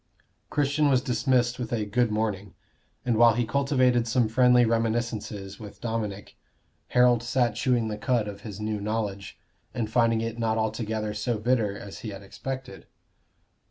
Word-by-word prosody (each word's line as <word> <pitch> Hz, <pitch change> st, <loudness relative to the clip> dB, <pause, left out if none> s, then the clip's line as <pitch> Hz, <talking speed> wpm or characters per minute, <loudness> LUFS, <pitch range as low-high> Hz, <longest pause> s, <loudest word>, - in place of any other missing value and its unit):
Christian 145 Hz, 0 st, +2 dB
was 130 Hz, -2 st, +3 dB
dismissed 125 Hz, -1 st, +1 dB
with 120 Hz, -2 st, -4 dB
a 110 Hz, -3 st, 0 dB
"good 120 Hz, +3 st, +1 dB
morning"; 105 Hz, -2 st, -2 dB, 0.5 s
and 120 Hz, -3 st, +1 dB
while 115 Hz, -1 st, +6 dB
he 120 Hz, 0 st, +1 dB
cultivated 130 Hz, -1 st, +2 dB
some 120 Hz, -1 st, +2 dB
friendly 125 Hz, +1 st, +5 dB
reminiscences 110 Hz, -3 st, -2 dB
with 105 Hz, -2 st, -10 dB
Dominic, 110 Hz, -4 st, -4 dB, 0.5 s
Harold 125 Hz, -1 st, +4 dB
sat 120 Hz, -1 st, +1 dB
chewing 120 Hz, 0 st, +1 dB
the 105 Hz, -1 st, -4 dB
cud 120 Hz, -2 st, +1 dB
of 100 Hz, -1 st, -7 dB
his 105 Hz, -3 st, -8 dB
new 105 Hz, -1 st, -2 dB
knowledge, 105 Hz, -2 st, -3 dB, 0.4 s
and 110 Hz, -2 st, -2 dB
finding 115 Hz, -1 st, +3 dB
it 115 Hz, +1 st, -4 dB
not 110 Hz, -1 st, 0 dB
altogether 110 Hz, -1 st, -2 dB
so 120 Hz, +1 st, -1 dB
bitter 110 Hz, -3 st, 0 dB
as 100 Hz, -3 st, -9 dB
he 110 Hz, -, -6 dB
had 100 Hz, -1 st, -8 dB
expected. 130 Hz, +6 st, -7 dB
115 Hz, 160 wpm, -26 LUFS, 105-125 Hz, 0.5 s, while